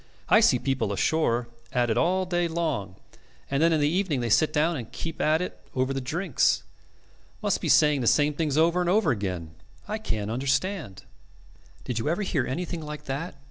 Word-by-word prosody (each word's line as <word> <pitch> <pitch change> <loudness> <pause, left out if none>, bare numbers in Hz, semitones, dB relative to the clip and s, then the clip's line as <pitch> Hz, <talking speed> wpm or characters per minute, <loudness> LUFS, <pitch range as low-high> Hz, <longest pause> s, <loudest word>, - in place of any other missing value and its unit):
I - - +7
see - - +5
people 125 -5 -1
ashore 120 +1 +1 0.2
at 120 -2 +1
it - - +1
all 185 +8 +2
day 175 -1 0
long, 155 - -2 0.6
and 140 +1 +1
then 165 +1 +4
in 160 - +2
the 145 - +3
evening 170 -3 0
they 120 -2 -2
sit 155 +7 +4
down 160 +3 +1
and 120 -6 -6
keep 165 -1 -5
at 155 +3 +2
it - - -7 0.2
over 130 +1 0
the 135 - -2
drinks. 160 +4 +1 0.8
Must - - +1
be - - -2
saying 150 -3 +5
the 120 - -1
same 150 +4 +3
things 150 -1 -1
over 170 +3 +3
and 175 - 0
over 210 +4 +3
again. 90 -7 -3 0.4
I 215 +1 -3
can't 110 - -3
understand.' 135 - -2 0.8
"Did 120 -3 -3
you 130 - -1
ever 175 +6 0
hear 150 -10 -1
anything 170 +4 -3
like 150 0 -7
that? 145 +4 -4
150 Hz, 195 wpm, -26 LUFS, 125-170 Hz, 0.8 s, I